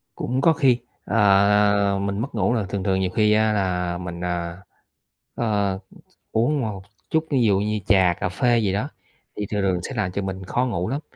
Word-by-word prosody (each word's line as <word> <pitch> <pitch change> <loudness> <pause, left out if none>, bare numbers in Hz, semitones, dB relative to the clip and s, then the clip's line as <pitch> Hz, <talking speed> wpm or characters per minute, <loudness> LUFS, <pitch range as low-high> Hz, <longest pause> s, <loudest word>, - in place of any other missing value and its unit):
Cũng 125 +2 -2
có 165 +4 +5
khi, 130 -5 +3 0.3
à, 100 0 +3
mình 100 0 -2
mất 120 +4 -4
ngủ 105 +1 +1
là 110 -4 0
thường 95 0 -4
thường 95 -1 +1
nhiều 95 -1 0
khi 105 +2 +2
á 110 0 +3
là 90 -3 -1
mình, 85 -1 -6
à, 85 -1 -3 0.8
ờ, 100 -4 0
th - - -17 0.3
uống 130 +7 +1
một 105 -6 -4 0.3
chút 160 0 +1
thí 140 - +2
dụ 100 -4 +3
như 105 +1 -1
trà 95 -5 +4
cà - - 0
phê 120 +6 +2
gì 105 -4 +1
đó, 105 +8 -1 0.5
thì 105 - -3
thường 105 -1 -1
thường 95 -2 +1
sẽ 135 - -6
làm 100 -4 -1
cho 100 - -2
mình 95 0 -5
khó 125 +7 0
ngủ 90 -7 -2
lắm. 140 +2 -2
100 Hz, 210 wpm, -23 LUFS, 95-110 Hz, 0.8 s, có